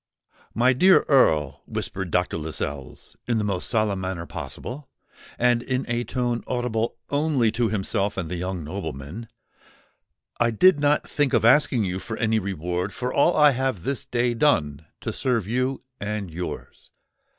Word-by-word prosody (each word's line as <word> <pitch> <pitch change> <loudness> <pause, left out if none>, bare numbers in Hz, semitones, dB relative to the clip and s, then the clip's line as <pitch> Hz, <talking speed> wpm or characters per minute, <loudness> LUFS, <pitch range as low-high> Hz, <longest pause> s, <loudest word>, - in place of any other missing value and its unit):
"My 125 +3 +4
dear 185 +9 +6
Earl," 75 - +3
whispered 95 -1 -4
Dr. 90 0 0
Lascelles, 75 -3 -6
in 120 -2 +1
the 110 - 0
most 100 -3 -1
solemn 110 -4 +1
manner 95 -2 -4
possible, 130 - -7 0.5
and 120 -1 +3
in 130 +1 -2
a 120 0 -1
tone 120 -2 -2
audible 120 -2 -1 0.2
only 145 -6 +2
to 115 0 0
himself 100 0 -1
and 90 -4 -2
the 90 - -4
young 90 -1 -4
nobleman, 80 - -6 1.1
"I 120 - +3
did 150 - +5
not 145 0 +2
think 145 -3 0
of - - +3
asking 125 -2 +5
you 95 -1 -2
for 115 +3 -6
any 110 -1 +1
reward 90 -1 -3
for 125 -2 -3
all 160 +4 +3
I 150 -1 +7
have 130 -8 -2
this 140 +2 -2
day 120 0 0
done 80 - +1
to - - -4
serve 115 -7 0
you 130 +3 -1 0.2
and 105 -3 -4
yours. 90 +2 -7
110 Hz, 160 wpm, -24 LUFS, 90-125 Hz, 1.1 s, I